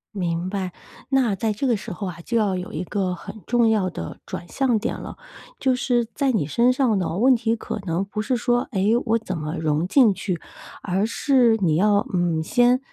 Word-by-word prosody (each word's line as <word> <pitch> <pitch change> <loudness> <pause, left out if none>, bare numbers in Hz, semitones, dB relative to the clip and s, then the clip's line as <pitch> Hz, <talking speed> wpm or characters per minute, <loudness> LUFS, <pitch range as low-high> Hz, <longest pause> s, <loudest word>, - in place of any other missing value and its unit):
明 175 -2 -1
白， 190 -2 -3 0.4
那 260 -6 +2
在 215 +3 -1
这 210 +7 -3
个 245 -3 +3
时 215 +2 -7
候 195 +2 -5
啊， 170 -2 -7
就 235 +5 -1
要 205 -4 +1
有 180 0 -5
一 155 - -3
个 185 -1 -2
很 210 +5 -10
重 240 -1 +3
要 200 -4 +1
的 - - -7
转 175 - -6
向 260 0 +1
点 210 - -2
了。 - - -8 0.4
就 260 -1 +2
是 245 -2 +1
在 270 +4 +1
你 205 -11 0
身 235 - +3
上 250 -6 +2
呢， 170 -1 -2
问 255 +5 +5
题 230 -1 0
可 220 - -5
能 170 +4 0
不 210 +2 -4
是 250 +2 0
说， 240 +1 +1
哎， 190 -5 0 0.2
我 225 0 +2
怎 200 -4 -5
么 155 +1 -4
融 155 +2 0
进 235 -3 +5
去， 185 -3 -3 0.4
而 190 +2 0
是 245 -2 +3
你 165 -5 +2
要 205 +4 +3
嗯， 175 -3 +1
先 245 +7 +3
210 Hz, 225 characters per minute, -23 LUFS, 180-240 Hz, 0.4 s, 问